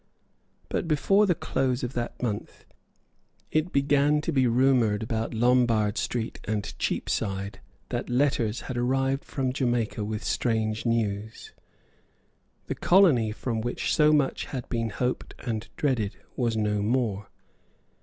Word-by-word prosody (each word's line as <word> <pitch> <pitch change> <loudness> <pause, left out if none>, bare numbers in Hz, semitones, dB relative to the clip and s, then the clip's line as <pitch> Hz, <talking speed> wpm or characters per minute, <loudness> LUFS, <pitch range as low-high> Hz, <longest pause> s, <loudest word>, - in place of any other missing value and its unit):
But, - - -2
before 195 +7 +3
the 180 - +3
close 130 -4 -1
of 125 +1 -3
that 120 +1 -4
month, 105 -4 -4 0.9
it 155 +3 +1
began 145 +1 +3
to 165 - -2
be 130 -4 +3
rumoured 120 -4 +3
about 110 0 -2
Lombard 115 -3 +3
Street 115 +1 -2
and 105 -1 -2
Cheapside 100 0 -2 0.3
that - - -3
letters 120 -3 +1
had 130 - -5
arrived 135 +2 +1
from 130 -2 -2
Jamaica 120 -5 0
with 105 +1 -4
strange 110 -1 0
news. 110 -2 -2 1.1
The - - -2
colony 155 - +4
from 115 +1 -3
which 120 +2 -1
so 150 0 +5
much 145 -3 +1
had 130 -3 -6
been 115 -2 -1
hoped 125 +4 -3
and 115 -3 -4
dreaded 120 -8 0 0.2
was 115 -3 0
no 105 -1 0
more. 110 -3 -1
120 Hz, 135 wpm, -27 LUFS, 110-135 Hz, 1.1 s, so